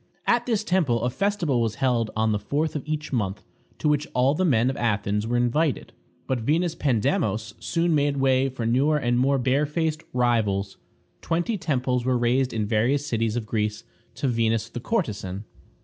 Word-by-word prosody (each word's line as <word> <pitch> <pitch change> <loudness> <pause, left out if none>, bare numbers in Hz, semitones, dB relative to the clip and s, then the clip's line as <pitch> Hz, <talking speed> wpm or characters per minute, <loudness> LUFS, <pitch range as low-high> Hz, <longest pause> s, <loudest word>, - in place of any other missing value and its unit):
At 240 0 +2
this 225 -3 +1
temple 160 - +1
a 125 - 0
festival 175 -7 0
was 110 -2 -1
held 120 -3 +1
on 110 0 +1
the 105 - 0
fourth 150 +10 -1
of 150 - -1
each 150 -1 -3
month, 105 -4 -2 0.3
to - - -1
which 150 0 +1
all 130 +2 +3
the 185 - 0
men 130 -6 +3
of 135 - -7
Athens 105 -2 0
were 120 +1 0
invited. 130 +5 0 0.3
But 130 -2 -1
Venus 160 +8 +1
Pandemos 110 -6 0
soon 170 0 0
made 145 -1 +1
way 135 0 +2
for 125 -3 -5
newer 135 +6 +2
and 120 -3 +1
more 135 +2 +3
barefaced 150 +5 0
rivals. 110 -6 0 0.4
Twenty 170 +7 -1
temples 130 -8 -1
were 130 0 +1
raised 125 +2 +1
in 110 -2 -1
various 120 +7 +1
cities 115 -4 -1
of 120 -2 -2
Greece 105 -1 -2 0.3
to 135 +4 -1
Venus 115 -2 0
the 120 - -6
Courtesan. 105 - -2
125 Hz, 180 wpm, -25 LUFS, 115-150 Hz, 0.4 s, all